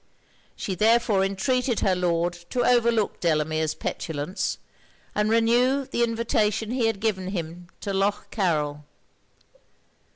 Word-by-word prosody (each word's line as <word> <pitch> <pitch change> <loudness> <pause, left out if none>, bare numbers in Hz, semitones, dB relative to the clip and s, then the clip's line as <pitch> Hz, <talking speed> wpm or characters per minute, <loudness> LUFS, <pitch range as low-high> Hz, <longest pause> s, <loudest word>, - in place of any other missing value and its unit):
She 195 - -3
therefore 215 0 +3
entreated 240 +5 0
her 190 - +2
Lord 175 -1 0 0.2
to 245 - 0
overlook 235 -3 +2
Delamere's 155 -1 0
petulance, 160 +4 -3 0.6
and 210 +1 +1
renew 240 +4 +3
the 240 - 0
invitation 225 -1 0
he 245 -2 +1
had 225 -3 -1
given 195 -4 -1
him 175 -2 -5
to 200 - -3
Lough 200 +2 0
Carryl. 150 -7 0
205 Hz, 120 wpm, -25 LUFS, 175-230 Hz, 0.6 s, therefore